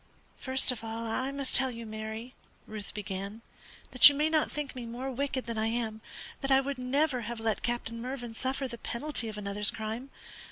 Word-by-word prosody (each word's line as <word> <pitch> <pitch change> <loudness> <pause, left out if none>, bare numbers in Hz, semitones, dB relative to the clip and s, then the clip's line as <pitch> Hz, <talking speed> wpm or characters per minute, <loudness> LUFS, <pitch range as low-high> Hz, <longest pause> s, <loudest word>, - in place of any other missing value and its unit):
"First 260 0 +4
of 235 -2 -6
all, 225 +1 -4
I 255 +4 -1
must 275 -1 -1
tell 265 -1 +6
you, 230 -2 -7
Mary," 220 +3 -6 0.3
Ruth 215 -2 -7
began, 200 +1 -5 0.5
"that 255 +2 +11
you 285 - -2
may 305 +2 +2
not 310 -1 +3
think 295 -3 -4
me 245 -2 -5
more 250 +3 -4
wicked 265 0 -2
than 230 -2 -3
I 220 - +2
am, 225 -1 -2 0.4
that 270 - -1
I 265 0 +7
would 270 -1 -3
never 260 +1 +1
have 235 +1 -5
let 225 -1 0
Captain 235 -1 -2
Mervyn 245 -2 -5
suffer 265 +3 -1
the 235 -2 -7
penalty 240 +1 -2
of 215 -1 -5
another's 205 0 +3
crime. 220 +4 -4
240 Hz, 200 wpm, -30 LUFS, 220-265 Hz, 0.5 s, that